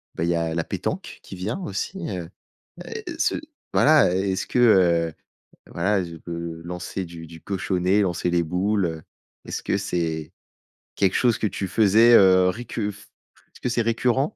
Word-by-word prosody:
bah, 80 - -2
il 85 - 0
y 85 - +2
a 80 -1 -1
la 85 - 0
pétanque, - - -4
qui - - -9
vient, 100 - -3
aussi, 175 - -4
heu, 90 -4 -5 0.9
ce - - +2 0.4
voilà, 150 - +5
est-ce 95 0 -1
que, 125 - 0
heu, 85 -8 +4 0.6
voilà, 95 +2 +1
je 85 -1 -8
peux 85 0 -6
lancer 90 +2 -5
du 85 -1 -10
du 80 0 -12
cochonnet, 95 +1 0
lancer 90 -1 -1
les 85 -1 +2
boules, 95 +3 0
heu, 80 -1 -5 0.4
est-ce - - -4
que - - 0
c'est 80 -5 -3 0.6
quelque 95 -1 +2
chose 120 -3 +3
que 110 - +1
tu 95 -1 -4
faisais, 110 +4 +5
heu, 95 -3 +6
récu 110 0 -3
f 105 +1 -16 0.5
est-ce - - -16
que 125 - -1
c'est 120 -1 +1
récurrent? 115 +3 +1
95 Hz, 170 wpm, -24 LUFS, 85-105 Hz, 0.9 s, heu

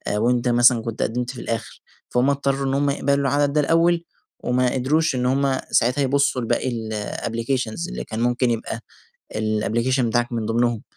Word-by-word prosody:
وأنت 120 +3 +1
مثلًا 120 -1 +5
كنت 115 -1 -5
قدمت 125 +1 -1
في 125 - -8
الآخر، 115 -1 -5 0.3
فهُم 125 +3 +2
اضطروا 140 -1 0
إن 135 - 0
هُم 140 +1 +1
يقبلوا 140 0 +1
العدد 145 +1 +1
ده 150 - +3
الأول 165 +2 +2 0.4
وما 125 0 +1
قدروش 140 +3 +1
إن 125 - -1
هُم 135 +1 +2
ساعاتها 125 +4 +2
يبصوا 135 -1 +2
لباقي 120 +2 0
الapplications 115 - -3
اللي - - -5
كان 110 - -6
ممكن 120 +1 +1
يبقى 115 0 -3 0.6
الapplication 110 +4 0
بتاعك 120 0 0
من 115 -2 -2
ضمنهم. 120 0 0
125 Hz, 165 wpm, -22 LUFS, 115-140 Hz, 0.6 s, مثلًا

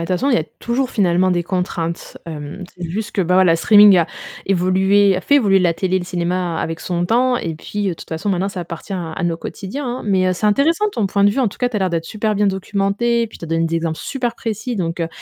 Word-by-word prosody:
toute - - -14
façon, 185 +10 +1
il - - +4
y - - +3
a 155 - -2
toujours, 250 +2 -1
finalement, 185 -3 +2
des 175 -1 +1
contraintes. 175 -2 -3
Hem, 155 +3 -7
c'est 180 -2 -6
juste 210 +6 -4
que, 200 - 0
bon, 180 +1 +4
la 165 -1 +4
streaming 205 0 +7
a 165 - +2 0.4
évolué, 190 +1 +3
a - - -2
fait 285 - +2
évoluer 200 -8 +4
la 175 -2 +2
télé 185 +2 0
et - - +2
le 175 - -5
cinéma 175 -1 -2
avec 165 0 -3
son 175 -1 -2
temps 245 +5 +2
et 165 -7 -3
puis, 205 +6 -5
de 180 - -1
toute - - -12
façon, 165 +6 -2
maintenant 190 +1 0
ça 190 -2 -5
appartient 170 +3 -7
à 170 -4 -4
à 165 - -5
nos 165 -1 0
quotidiens, 240 - -6
hein. - - -8
Mais, 190 -3 +2
heu, 185 - +2
c'est 210 +4 -1
intéressant 325 - +2
ton 220 - -1
point 200 +1 +1
de 205 - +6
vue, 270 - -1
en 245 - +2
tout - - -13
cas. 245 - +1
Tu 235 - -4
as - - +2
l'air 190 -2 0
d'être 165 -1 -1
super 215 0 -1
bien 205 0 +2
documenté 200 +5 0
puis 220 - -13
tu - - -7
as - - -8
donné 165 0 +1
des 165 0 0
exemples 165 -1 -2
super 245 -3 -3
précis. 225 +2 -4
Donc, 170 -2 -2
heu, 165 - -1
190 Hz, 275 wpm, -19 LUFS, 170-210 Hz, 0.4 s, streaming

